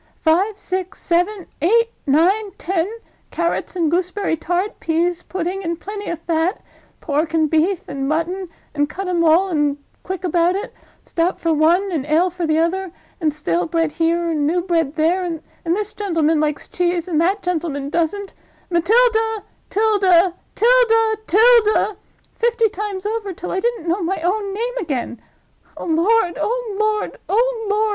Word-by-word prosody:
Five, 380 +6 +2
six, 375 0 -4
seven, 360 +2 0 0.2
eight, 460 +8 +3 0.2
nine, 380 +8 +2
ten. 365 -2 -1 0.4
Carrots 340 +2 -2
and 330 -4 +1
gooseberry 365 +1 0
tart—pease 350 0 -1
pudding 370 +2 -4
and 335 -1 -3
plenty 410 +2 -6
of 340 - -2
fat—pork 325 -2 -3
and 315 -1 +3
beef 335 +3 +1
and 275 -1 -3
mutton, 345 +4 -1 0.2
and 290 -1 0
cut 385 +4 -5
'em 350 -2 +1
all, 335 +4 +4
and 295 -4 +1 0.2
quick 375 0 -5
about 350 +1 +2
it—stout 370 -4 -4
for 330 -1 +1
one, 340 +6 +3
and 300 -5 -2
ale 335 +4 +3
for 350 -1 -3
t'other—and 335 0 -1
stale 175 - -1
bread 330 -1 0
here, 335 +1 0
and 295 -2 0
new 350 +3 +1
bread 330 -5 0
there—and 335 +1 0 0.2
this 375 +5 -1
gentleman 330 -6 +1
likes 300 -1 -1
cheese, 350 -1 -1
and 325 -3 +1
that 390 +4 +1
gentleman 310 -5 -2
doesn't—Matilda, 410 +5 0 0.3
Tilda, 390 -4 +3 0.2
Tilda, 450 -2 +4
Tilda, 435 0 +4 0.4
fifty 460 -1 +2
times 405 -1 -5
over, 425 -2 -2
till 360 - -6
I 375 - 0
didn't 465 -5 -2
know 355 +4 0
my 360 +3 -1
own 395 +3 0
name 475 +5 -3
again—oh 260 - -7
lord! 350 +3 +2
oh 465 -3 -2
lord!! 430 0 0
oh 460 +1 +1
lord!!! 415 +1 +2
360 Hz, 145 wpm, -20 LUFS, 330-410 Hz, 0.4 s, all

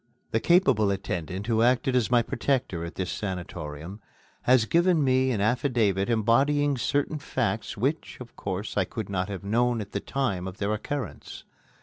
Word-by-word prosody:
The 110 - +2
capable 130 - +4
attendant 95 -1 -3
who 115 -1 +1
acted 125 +2 +3
as 125 -3 +2
my 120 -1 +4
protector 120 -8 -1
at 85 - -7
this 95 -2 -3
sanatorium 90 -1 -5 0.4
has 125 -2 +4
given 170 +2 +3
me 130 0 +3
an 115 -6 0
affidavit 110 -4 +1
embodying 135 +6 +3
certain 145 +4 0
facts 120 -6 -2
which, 140 +9 -2
of 125 -2 -11
course, 100 +2 -4
I 100 - +4
could 105 +2 -6
not 95 0 -1
have 100 -1 -5
known 120 +3 +1
at 105 -2 -6
the 100 - -2
time 100 -8 -2
of 95 +1 -7
their 100 +1 -1
occurrence. 130 +4 -5
115 Hz, 165 wpm, -27 LUFS, 100-130 Hz, 0.4 s, capable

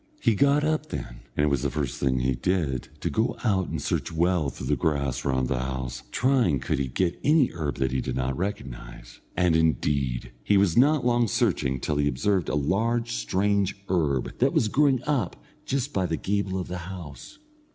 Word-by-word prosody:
He 115 - +3
got 140 +6 +3
up 155 0 0
then, - - -6 0.2
and 75 - +3
it - - +2
was 70 - +1
the - - 0
first 70 -5 -3
thing 65 -2 +1
he 65 +1 +1
did 75 -4 -1
to - - -1
go 110 +2 0
out 95 -6 +1
and - - -3
search - - -2
well 85 -2 +1
through - - -8
the - - +2
grass 70 -5 -1
round 65 -2 +1
about - - -4
the - - -2
house, 65 -1 -4
trying 120 - +2
could 65 - -1
he 70 - 0
get 85 +8 -1
any 150 -3 +4
herb 75 -4 -3
that 65 -1 0
he 65 0 0
did 65 - -3
not 65 +1 -1
recognise. 65 - -6 0.2
And, 90 -3 +3
indeed, 70 -6 0
he 100 - +3
was 95 -4 +3
not 140 +1 +4
long 120 -1 +3
searching 95 - 0
till 75 +2 -1
he 75 0 +2
observed 90 +7 0
a - - 0
large 110 +11 0
strange 95 +12 0
herb 75 -8 0
that - - +3
was 110 - +2
growing 135 -1 +3
up 145 -4 0 0.3
just 140 +1 -1
by 95 -2 +1
the 80 -1 -1
gable 100 -1 -1
of 90 - -4
the 90 0 -5
house. 90 - -9
85 Hz, 205 wpm, -26 LUFS, 65-105 Hz, 0.3 s, any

